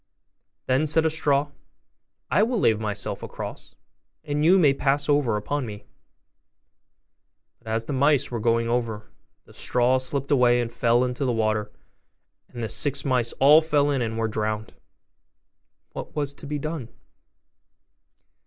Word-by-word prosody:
Then 130 +4 +1
said 160 +2 +2
a 160 - +2
straw, 145 -2 +1 0.8
'I 205 - +4
will 235 +3 +1
lay 115 - +4
myself 105 -2 -4
across, - - -8 0.5
and 150 -1 -2
you 180 +4 +6
may 150 -7 +4
pass 140 +2 0
over 145 -7 +2
upon 140 +7 -3
me.' 105 -1 -9 1.7
But - - -22
as 110 +1 -2
the 145 - -4
mice 140 0 +2
were 120 - -3
going 115 +1 +1
over, 115 -3 -2 0.3
the - - -18
straw 125 +1 +1
slipped 135 +2 -4
away 125 -3 +4
and 120 -1 -2
fell 120 +1 +2
into 125 +1 -2
the 130 - +1
water, 110 -2 -1 0.8
and 120 -1 -7
the - - -1
six 140 +4 0
mice 125 -4 +1
all 150 +4 +6
fell 145 -2 +1
in 135 -3 0
and 110 -1 -3
were 115 0 0
drowned. 110 0 -3 1.2
What - - -8
was 145 -2 -2
to 140 - -11
be 150 +1 -3
done? 150 -5 -5
130 Hz, 155 wpm, -24 LUFS, 115-145 Hz, 1.7 s, you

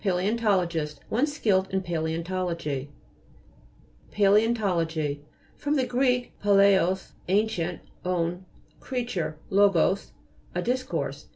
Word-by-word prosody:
PA'LJEOXTO'LOGIST 180 -6 0
One 250 +7 +2
skilled 205 -10 +1
in 190 0 0
paleontology. 165 -3 -2 1.2
PALJEOXTO'LOGY 195 -8 +2 0.3
fr. 290 - -5
gr. 260 -3 +1 0.4
palaios, 195 -2 +4 0.2
an 200 +4 +3
cient, 175 -4 -3 0.2
on, 180 0 -1 0.4
creature, 235 -11 -3
logos, 195 -1 +3 0.4
a - - -1
dis 250 +2 0
course. 255 - -4
190 Hz, 90 wpm, -26 LUFS, 170-210 Hz, 1.2 s, palaios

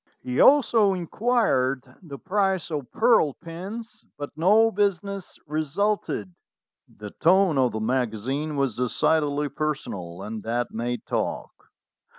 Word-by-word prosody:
He 125 0 -3
also 230 -8 +5
inquired 170 - +1 0.2
the 150 -6 -9
price 190 0 -1
of 145 -5 -4
pearl 225 - +3
pins, 215 +7 -8
but 145 0 -6
no 210 +8 +4
business 200 -1 -2
resulted." 155 - -2 0.5
The 105 -1 -10
tone 180 -3 +3
of 125 -3 +2
the 110 - -2
magazine 130 +5 -1
was 135 -5 0
decidedly 145 +4 +1
personal, 100 - -4
and 110 +1 -6
that 120 +2 -2
made 120 +1 -3
talk. - - -2
155 Hz, 120 wpm, -25 LUFS, 125-200 Hz, 0.5 s, also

